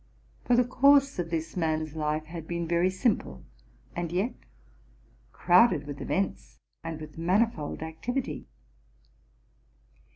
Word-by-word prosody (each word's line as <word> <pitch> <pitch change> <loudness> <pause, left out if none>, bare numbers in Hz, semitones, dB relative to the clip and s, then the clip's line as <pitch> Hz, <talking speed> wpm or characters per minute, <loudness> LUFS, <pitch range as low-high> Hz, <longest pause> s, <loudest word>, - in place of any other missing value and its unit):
For 245 - +4
the 250 - +5
course 275 0 +4
of 170 -1 -2
this 165 -1 -3
man's 155 -3 -1
life 155 0 -1
had 160 0 -8
been 170 -1 -3
very 170 +2 +2
simple, 185 - -1 0.5
and 170 -1 -3
yet 195 +8 0 1.0
crowded 180 -3 +4
with 145 -1 -7
events 190 +7 -2 0.3
and 165 -1 -5
with 155 +1 -10
manifold 180 -3 0
activity. 160 - -4
170 Hz, 120 wpm, -28 LUFS, 155-200 Hz, 1.0 s, the